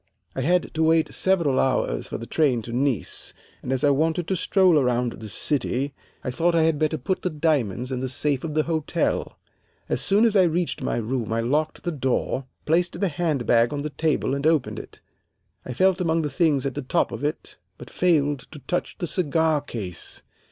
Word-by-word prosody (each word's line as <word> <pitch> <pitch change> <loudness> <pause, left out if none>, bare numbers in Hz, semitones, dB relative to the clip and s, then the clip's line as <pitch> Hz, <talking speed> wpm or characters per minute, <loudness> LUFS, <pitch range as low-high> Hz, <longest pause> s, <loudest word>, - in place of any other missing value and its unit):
"I 130 - -2
had 175 +6 +1
to 160 - -1
wait 160 0 +3
several 170 -8 +2
hours 130 - 0
for - - -4
the 115 - -7
train 130 -5 +1
to 115 - -7
Nice, 130 -3 -2 0.3
and 125 - -4
as 130 -1 0
I 145 - +5
wanted 160 +4 +1
to 190 - +1
stroll 185 -2 +4
around 125 -2 +1
the 110 -1 -9
city 135 - -1 0.3
I 125 - -2
thought 170 +6 +1
I 165 - +4
had 160 -2 +2
better 155 0 +1
put 185 +7 -2
the 180 - -1
diamonds 140 - 0
in 130 - -2
the 130 0 -3
safe 140 +1 0
of 155 -2 -4
the 155 - +3
hotel. 160 -2 -1 0.5
As - - -1
soon 205 +4 +3
as 220 -2 +2
I 195 - +7
reached 170 +1 -1
my - - -1
room 115 0 -2
I 115 0 +1
locked 150 +6 -1
the 175 - -1
door, 135 -2 -1 0.2
placed 170 +3 +1
the 195 - +1
hand 150 -5 -1
bag 115 0 +4
on 145 -1 -3
the 150 - -4
table 155 -3 0
and 140 +2 0
opened 160 -5 +1
it. - - -12 0.7
I 125 - -4
felt 185 +7 +2
among 165 -1 +1
the 150 - -2
things 145 -2 +2
at 135 - -1
the - - -4
top 130 - 0
of - - -6
it, 150 +1 -4 0.2
but - - -11
failed 145 -5 +2
to 155 - -11
touch 150 +6 -3
the 175 - -2
cigar 160 -3 +1
case. 105 - -6
150 Hz, 210 wpm, -24 LUFS, 130-165 Hz, 0.7 s, I